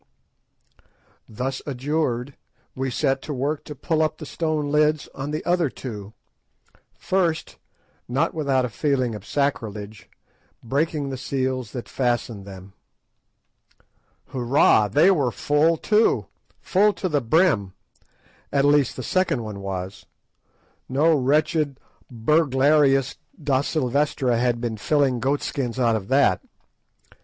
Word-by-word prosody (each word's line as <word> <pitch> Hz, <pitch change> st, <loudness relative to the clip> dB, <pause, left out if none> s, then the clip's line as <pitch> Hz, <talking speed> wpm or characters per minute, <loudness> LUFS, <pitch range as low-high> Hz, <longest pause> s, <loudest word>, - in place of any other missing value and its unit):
Thus 130 Hz, +4 st, -3 dB
adjured, 135 Hz, -1 st, -2 dB, 0.4 s
we 130 Hz, +1 st, -2 dB
set 135 Hz, +1 st, 0 dB
to 150 Hz, -, -5 dB
work 140 Hz, +4 st, -2 dB
to 150 Hz, -, -8 dB
pull 160 Hz, +3 st, 0 dB
up 155 Hz, -, 0 dB
the 155 Hz, -, -8 dB
stone 155 Hz, -2 st, -2 dB
lids 150 Hz, 0 st, +2 dB
on 135 Hz, +1 st, -5 dB
the 155 Hz, +1 st, -4 dB
other 175 Hz, -4 st, +2 dB
two, 105 Hz, -6 st, -8 dB, 0.8 s
first—not 165 Hz, -4 st, -2 dB
without 140 Hz, -5 st, +1 dB
a -, -, -4 dB
feeling 130 Hz, -1 st, 0 dB
of 105 Hz, -3 st, -8 dB
sacrilege—breaking 135 Hz, +4 st, -4 dB
the 130 Hz, -, -4 dB
seals 130 Hz, -3 st, -2 dB
that 125 Hz, -, -6 dB
fastened 120 Hz, -5 st, -2 dB
them. 95 Hz, 0 st, -11 dB, 1.6 s
Hoorah! 120 Hz, -4 st, +3 dB
they 160 Hz, -, +5 dB
were 145 Hz, -9 st, +2 dB
full 150 Hz, +6 st, +2 dB
too, 215 Hz, +5 st, +2 dB, 0.3 s
full 205 Hz, +2 st, +3 dB
to 190 Hz, -, -3 dB
the 150 Hz, -5 st, 0 dB
brim; 120 Hz, -, +2 dB, 0.8 s
at 140 Hz, 0 st, +2 dB
least, 145 Hz, -2 st, +3 dB
the 130 Hz, -, -6 dB
second 180 Hz, -6 st, 0 dB
one 105 Hz, -2 st, -6 dB
was; 95 Hz, -1 st, -6 dB, 0.8 s
no 150 Hz, +5 st, +3 dB
wretched 145 Hz, +1 st, +1 dB, 0.3 s
burglarious 135 Hz, +1 st, +2 dB, 0.2 s
Da 140 Hz, -4 st, +1 dB
Silvestra 140 Hz, -3 st, 0 dB
had 120 Hz, -1 st, +1 dB
been 115 Hz, -2 st, -3 dB
filling 135 Hz, +1 st, +1 dB
goat 140 Hz, +5 st, 0 dB
skins 125 Hz, -3 st, -3 dB
out 115 Hz, -3 st, +3 dB
of 100 Hz, -3 st, -4 dB
that. 135 Hz, -8 st, +3 dB
135 Hz, 120 wpm, -23 LUFS, 120-150 Hz, 1.6 s, they